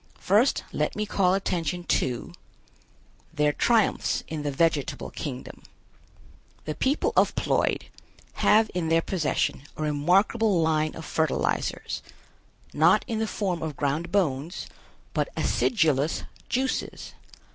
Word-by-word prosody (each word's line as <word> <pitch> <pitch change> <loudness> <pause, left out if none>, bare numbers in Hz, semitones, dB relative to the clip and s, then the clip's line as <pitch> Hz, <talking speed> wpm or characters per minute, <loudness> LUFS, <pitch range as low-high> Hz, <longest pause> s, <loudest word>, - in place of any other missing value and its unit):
First, 215 +8 +2
let 150 - -1
me 210 - -1
call 190 -3 +2
attention 175 -3 -2
to: 125 -7 -1 1.0
THEIR 150 0 +2
TRIUMPHS 230 +3 +2
IN 155 -2 -4
THE 145 - -2
VEGETABLE 145 -1 0
KINGDOM. 130 -5 -6 1.0
The 155 - -2
people 270 - 0
of - - +3
Ploid - - +1 0.6
have 215 +1 +4
in 175 -3 -1
their 165 0 +3
possession 165 -7 -1 0.2
a 155 - -3
remarkable 185 +7 +2
line 155 -1 +1
of 160 - -8
fertilizers, 160 -1 -1 0.7
not - - +4
in 225 -2 -2
the 220 - 0
form 185 -5 -2
of 155 -3 -4
ground 150 +4 -1
bones, 165 -4 0 0.5
but - - 0
acidulous 155 - +1 0.3
juices. 260 +1 -2
165 Hz, 120 wpm, -26 LUFS, 150-200 Hz, 1.0 s, have